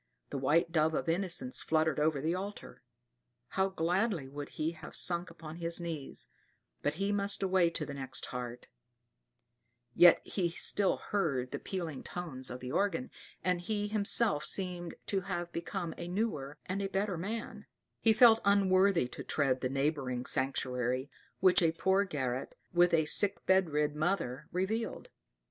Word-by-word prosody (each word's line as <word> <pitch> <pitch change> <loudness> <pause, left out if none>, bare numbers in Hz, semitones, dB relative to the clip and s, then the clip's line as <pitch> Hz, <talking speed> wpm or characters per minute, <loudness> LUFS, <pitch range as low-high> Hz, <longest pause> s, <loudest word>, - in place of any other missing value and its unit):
[*] - - -48
The 140 - -2
white 165 +5 +2
dove 160 -1 +2
of - - -2
innocence 170 -6 0
fluttered 160 -2 +1
over 150 -2 +1
the 160 +3 0
altar. 200 +3 -6 0.7
How 190 0 +1
gladly 180 - 0
would 145 +1 -7
he 155 +1 0
have 155 -3 -10
sunk 175 0 +2
upon 165 -1 -10
his 170 0 -3
knees; 165 -5 -5 0.6
but 145 +1 -1
he 195 +4 -1
must 200 -1 0
away 185 -3 +3
to 170 - -4
the 140 - -7
next 130 -1 -3
heart; 125 -1 -6 1.3
yet 175 +5 +7
he 180 -4 -1
still 190 +3 +2
heard 140 -11 -1
the - - -4
pealing 170 -7 -4
tones 145 -8 -5
of 125 0 -7
the 125 0 -5
organ, 205 - 0 0.3
and 180 -1 +1
he 205 +2 -2
himself 210 -5 +3
seemed 180 -3 -3
to 195 -2 0
have 175 -2 -4
become 170 0 -4
a 170 - -5
newer 175 -8 -2
and 190 +2 -2
a 195 - -2
better 195 0 -1
man; 215 +7 -5 0.3
he 225 - +5
felt 225 0 +7
unworthy 195 -5 +4
to - - -7
tread 135 -3 0
the 130 - -1
neighboring 135 -3 -1
sanctuary 130 0 -1 0.3
which 185 -1 +5
a 165 -1 +3
poor 190 +4 +2
garret, 130 -7 -3 0.2
with 175 0 +5
a 160 -2 +3
sick 200 +5 +4
bed 190 -2 +4
rid 150 0 0
mother, 150 -4 -1
revealed. 220 - -2
170 Hz, 160 wpm, -32 LUFS, 145-195 Hz, 1.3 s, yet